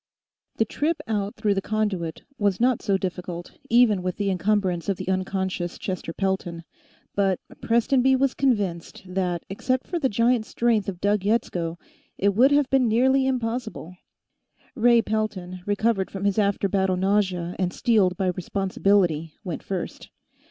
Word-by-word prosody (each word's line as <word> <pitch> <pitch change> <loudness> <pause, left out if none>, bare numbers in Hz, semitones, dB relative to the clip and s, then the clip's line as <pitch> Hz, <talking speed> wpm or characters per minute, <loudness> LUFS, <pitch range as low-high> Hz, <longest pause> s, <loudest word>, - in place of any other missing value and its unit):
The 225 - +2
trip 305 +8 -1
out 205 -2 -2
through 215 -2 +1
the 195 - -1
conduit 195 -7 -2 0.2
was 200 -3 +1
not 250 0 +2
so 195 -1 +1
difficult, 180 -2 -5 0.2
even 230 -5 +4
with 180 -1 -2
the 200 -1 0
encumbrance 185 -1 0
of 195 - 0
the - - -6
unconscious 185 -1 -2
Chester 185 -3 -4
Pelton, 185 -2 -2 0.5
but 195 -2 +1 0.2
Prestonby 255 +3 +3
was 270 0 +2
convinced 200 -13 -1
that, 180 -2 -2
except 255 +6 -1
for 345 - -3
the 270 -4 +1
giant 230 +1 +2
strength 230 -4 +1
of 180 -3 -7
Doug 205 +1 +2
Yetsko, 180 -6 0 0.4
it 200 - +3
would 250 +7 +5
have 285 -1 +3
been 265 -2 +4
nearly 265 +4 +3
impossible. 230 -8 -3 0.8
Ray 235 -2 +4
Pelton, 200 -5 -3
recovered 205 -1 +1
from 195 0 -5
his 200 +1 +2
after 200 -1 +1
battle 190 -1 +1
nausea 185 -3 0
and 180 -1 0
steeled 195 -6 +2
by 190 -1 +1
responsibility, 180 -3 0
went 175 -6 -4
first. 190 -3 -5
200 Hz, 150 wpm, -24 LUFS, 185-230 Hz, 0.8 s, would